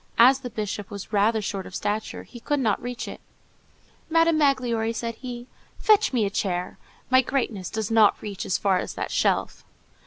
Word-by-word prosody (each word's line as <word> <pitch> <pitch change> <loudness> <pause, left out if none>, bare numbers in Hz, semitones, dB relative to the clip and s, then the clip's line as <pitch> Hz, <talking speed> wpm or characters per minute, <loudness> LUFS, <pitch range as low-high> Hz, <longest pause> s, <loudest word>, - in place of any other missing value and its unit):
As 260 +3 +7
the 255 -2 -6
bishop 210 -2 -4
was 205 0 -8
rather 215 +2 +2
short 195 -1 -4
of 185 - -10
stature, 210 +1 -3
he 240 - -12
could 290 +4 -1
not 220 -6 +1
reach 245 0 -5
it. - - -8 0.9
"Madame 330 -1 +3
Magloire," 245 -6 +1
said 230 0 -3
he, 240 0 -7 0.3
"fetch 430 -1 +4
me 235 -5 +1
a 200 - -2
chair. 180 -3 -2 0.3
My 260 0 +7
greatness 235 -8 -2
[grandeur] - - -21
does 220 0 -2
not 220 -2 +5
reach 200 -3 -6
as 185 - 0
far 190 -2 +2
as - - -5
that - - -4
shelf." - - 0
225 Hz, 190 wpm, -25 LUFS, 205-255 Hz, 0.9 s, As